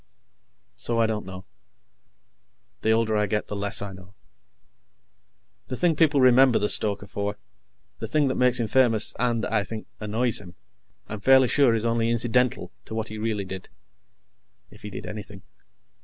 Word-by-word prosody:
So, 115 - -2
I 115 - +3
don't 110 -3 -3
know. 95 0 -9 1.4
The 110 - 0
older 110 -1 +2
I 105 -1 +1
get, 105 +1 -1
the 105 - -4
less 100 0 -2
I 100 - -6
know. 95 +1 -15 1.5
The 130 - -4
thing 165 +4 +1
people 150 -2 +3
remember 130 -1 +5
the 105 - 0
stoker 100 -1 +2
for 100 +1 -4 0.6
the - - -4
thing 150 -2 +1
that 130 - 0
makes 125 -1 +2
him 115 - -1
famous, 115 -2 +2
and, 120 -3 0
I 105 -2 0
think, 110 +2 -7
annoys 110 +2 +2
him 90 -3 -13 0.5
I'm 110 - -6
fairly 130 +3 +5
sure 135 -6 +3
is 110 0 -2
only 115 0 +1
incidental 120 +1 +1
to 110 - -7
what 110 0 -3
he 110 0 -7
really 105 -2 -2
did. 95 0 -8 1.0
If - - -16
he 105 - -7
did 95 - -8
anything. 105 -2 -9
110 Hz, 170 wpm, -25 LUFS, 105-125 Hz, 1.5 s, remember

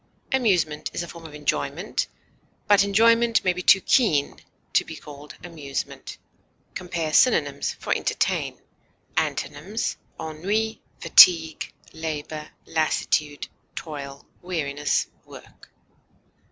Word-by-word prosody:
Amusement 180 - +1
is - - -1
a - - -7
form 170 -1 -10
of 150 - -12
enjoyment, 150 -1 -2 0.6
but 205 -1 +6
enjoyment 230 +3 +4
may 185 - +2
be 180 - -5
too 190 - +6
keen 160 - +2 0.3
to - - +4
be - - -9
called 145 0 -11
amusement. 155 -6 -6 0.6
Compare 170 -4 -3
synonyms 145 - +3
for - - -1
ENTERTAIN. - - -1 0.6
Antonyms: 190 +11 -2 0.2
ennui, 195 +8 -2 0.2
fatigue, 160 -3 +6 0.2
labor, 155 -1 -5 0.2
lassitude, 155 -2 0 0.3
toil, 140 -3 -7 0.2
weariness, 150 -5 -1 0.2
work. - - -15
160 Hz, 100 wpm, -24 LUFS, 150-195 Hz, 0.6 s, but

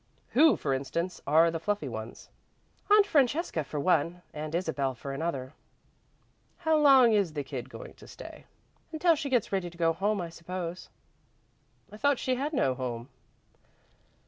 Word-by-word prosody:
"Who, 310 +4 +5
for 140 - -1
instance, 170 +7 -3
are 160 +3 +5
the 165 - -3
fluffy 205 -3 -2
ones?" 110 -2 -8 0.6
"Aunt 415 0 +7
Francesca 280 - +1
for 140 +2 -5
one 170 +2 +1
and 155 +1 -5
Isabel 145 -7 -1
for 135 +3 -7
another." 135 -3 -3 1.0
"How 320 -2 +1
long 270 -6 +6
is 200 -7 +1
the 145 -2 -3
kid 130 -2 -6
going - - -10
to - - -16
stay?" - - -11 0.5
"Until 335 +2 +3
she 285 -2 -3
gets 245 -5 +1
ready 190 -3 -1
to 170 - -17
go 165 -1 +2
home, 200 +4 0
I 170 -2 -4
suppose." 170 +1 -6 1.0
"I 210 - -10
thought 285 +3 +2
she 255 - -1
had 275 +4 -2
no 135 - +1
home." 125 -1 -5
170 Hz, 160 wpm, -29 LUFS, -, 1.0 s, Aunt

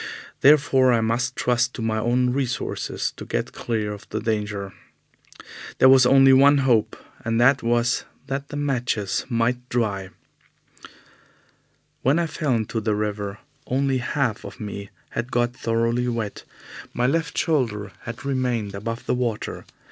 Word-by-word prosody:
Therefore 135 -3 +5
I 115 - +3
must 120 +3 0
trust 125 +1 +1
to - - -5
my 110 -1 0
own 125 +2 +1
resources 130 -2 -2
to - - -7
get - - -3
clear 110 -3 -2
of 100 - -12
the - - -2
danger. 105 -3 -2 1.0
There 130 - +6
was 130 -2 +7
only 135 0 +7
one 140 +2 +6
hope, 115 -5 +2 0.3
and 115 -1 0
that 130 +2 +5
was 120 +1 +1 0.2
that 140 +1 -4
the 145 - -8
matches 125 -8 -1
might 120 +1 0
dry. 100 -6 -1 1.9
When 135 +5 +3
I 170 - +1
fell 150 -4 -1
into 110 0 -2
the 105 -1 0
river, 105 -1 -3 0.3
only 135 0 +1
half 125 -3 -1
of - - -10
me 100 -2 -6 0.2
had 120 +2 -4
got 120 0 +1
thoroughly 115 +1 0
wet. 115 -4 -3 0.5
My 120 - +1
left 160 +3 0
shoulder 115 - 0
had 120 +3 -8
remained 125 -6 -1
above 115 +4 -5
the - - 0
water. 120 -4 -3
120 Hz, 150 wpm, -23 LUFS, 110-130 Hz, 1.9 s, was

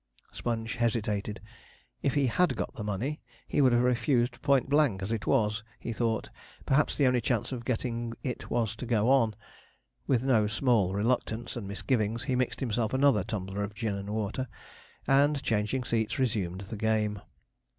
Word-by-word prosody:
Sponge 115 0 -3
hesitated. 105 -3 -1 0.6
If 140 - 0
he 140 -2 +3
had 175 +9 +2
got - - -3
the 105 - -6
money, 105 +9 -2 0.3
he - - +1
would 130 -2 +5
have 120 0 +3
refused 120 0 +1
point 140 -3 +3
blank; 140 -9 +2
as 100 - -3
it 110 -3 -2
was, 105 -4 +2 0.2
he 115 - -4
thought, 115 -1 -1 0.3
perhaps 140 +2 +2
the 140 - +4
only 125 -1 +3
chance 120 0 0
of 125 -2 -4
getting 115 -1 -2
it 125 -4 -4
was 115 -3 0
to 125 - -6
go 115 +1 +3
on. 115 -6 +3 0.7
With 125 -2 +2
no 115 -6 +3
small 110 -3 +2
reluctance 115 +1 -1
and 115 -5 -5
misgivings 105 +3 -1
he 130 - 0
mixed 125 0 -1
himself 115 -1 0
another 130 -7 +4
tumbler 100 -1 -4
of 105 +1 -5
gin 110 -1 -2
and 100 0 -5
water, 110 +4 -2 0.6
and, 140 +1 +3
changing 115 +1 0
seats, 115 -2 -1
resumed 100 -8 -1
the 100 +3 -7
game. 105 -1 0
115 Hz, 170 wpm, -29 LUFS, 105-130 Hz, 0.7 s, would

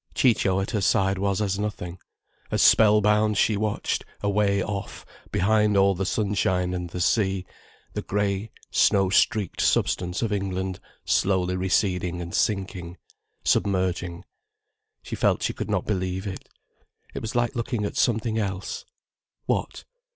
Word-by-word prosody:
Ciccio 105 -7 +3
at 95 - -3
her 105 - 0
side 95 +1 +2
was 100 +1 0
as 100 -1 -1
nothing, 95 -4 -4 0.5
as - - +2
spell 105 -1 +6
bound 105 0 +2
she 105 +2 +3
watched, 105 0 -1 0.2
away 100 -1 +2
off, 100 0 -5 0.3
behind 105 +1 +3
all 100 0 +5
the 95 +1 -2
sunshine 95 -4 0
and 90 -1 -4
the 90 - -6
sea, 95 0 +1 0.5
the - - -3
grey, 100 +1 -1 0.2
snow 95 -2 +3
streaked 100 0 +2
substance 90 +4 +1
of 110 -2 0
England 95 -2 -2 0.3
slowly 90 -1 +1
receding 90 -1 0
and 85 0 -6
sinking, 95 -4 -1 0.5
submerging. 90 -3 0 0.8
She - - -5
felt - - +1
she - - 0
could - - -5
not - - 0
believe 95 -1 -2
it. 95 -2 -7 0.6
It - - -5
was 110 +2 -5
like 120 -1 +1
looking 115 -2 -2
at - - -4
something 110 -1 +1
else. 95 -2 -4 0.6
What? - - -2
100 Hz, 145 wpm, -25 LUFS, 95-105 Hz, 0.8 s, spell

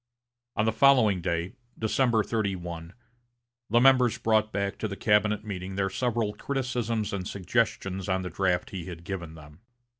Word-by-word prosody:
On 110 - +1
the 110 - +3
following 110 -6 +4
day, 85 +3 -2 0.2
December 115 0 +2
31, 90 -6 -3 0.8
the 120 +3 +4
members 125 -2 +5
brought 110 -2 +2
back 100 0 -2
to 110 - -1
the 100 - -5
cabinet 105 +1 +2
meeting 95 -2 -5
their 95 -1 0
several 120 -2 -1
criticisms 120 -4 -2
and 95 -1 -3
suggestions 95 -2 -1
on 95 0 0
the 90 - -5
draft 95 -2 0
he 90 -4 -5
had 85 -2 -8
given 85 -3 -6
them. 75 0 -14
100 Hz, 155 wpm, -27 LUFS, 90-115 Hz, 0.8 s, members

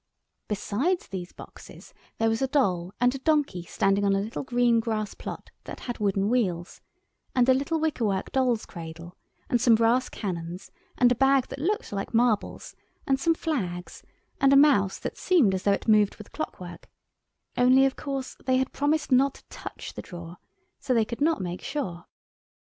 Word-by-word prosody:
Besides 245 - -1
these 180 -2 -6
boxes - - -13 0.2
there 225 - +2
was 225 +2 0
a 265 - +2
doll 190 -11 +1
and 245 +1 +3
a 275 - -5
donkey 290 - +1
standing 195 +1 +1
on 200 -1 +3
a 200 +2 -1
green 245 -2 +1
grass 220 -2 -2
plot - - -8
that - - -8
had 240 -1 -5
wooden 200 -1 +1
wheels, 190 -8 -1 0.5
and 250 -1 +4
a 260 - +7
little 285 +5 0
wicker 310 -6 -1
work 195 -2 -1
doll's 250 -4 +1
cradle, 170 0 -9 0.3
and 240 - +1
some 235 -2 +6
brass 230 +3 +2
cannons, 175 -2 -5 0.3
and 245 -1 +5
a - - +6
bag 270 +1 +3
that - - -7
looked 410 +9 -1
like 200 +3 -4
marbles, 230 -2 0 0.3
and 270 -1 +1
some 330 +3 +2
flags, 185 - -4 0.4
and 275 -1 +4
a - - +6
mouse 265 -10 +4
that - - -6
seemed 295 - +3
as 190 - -1
though 200 - +2
it 200 - -4
moved 210 -2 +4
with - - -13
clockwork; - - -7 0.7
only, 255 +2 +5
of 270 - 0
course, 275 -2 -5
they 260 0 +3
had 265 0 -1
promised 295 +1 0
not 270 +2 +4
to - - -16
touch - - -8
the - - -6
drawer, 175 -1 -10 0.4
so 255 - 0
they 225 -2 +3
could 235 +4 -7
not 320 -5 +2
make 175 0 -5
sure. 185 - -4
235 Hz, 180 wpm, -26 LUFS, 195-270 Hz, 0.7 s, a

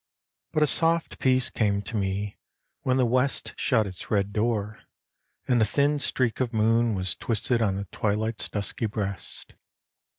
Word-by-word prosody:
But 155 -1 +2
a - - +6
soft 165 +2 +1
peace 130 -1 +2
came 100 -2 +1
to 110 +3 -6
me 100 0 -2 0.4
when 130 0 +1
the 130 - +4
West 130 +3 0
Shut 115 -5 +2
its 95 -2 -8
red 100 -1 +1
door 110 -1 -1 0.7
and 120 -2 +3
a - - +6
thin 145 +4 +2
streak 130 -4 0
of 125 -2 -1
moon 115 +1 +3
Was 95 -1 -1
twisted 115 +1 0
on 100 -4 +2
the 100 +1 -4
twilight's 110 +1 -1
dusky 105 +2 -2
breast. 100 -2 -5
110 Hz, 160 wpm, -26 LUFS, 100-130 Hz, 0.7 s, a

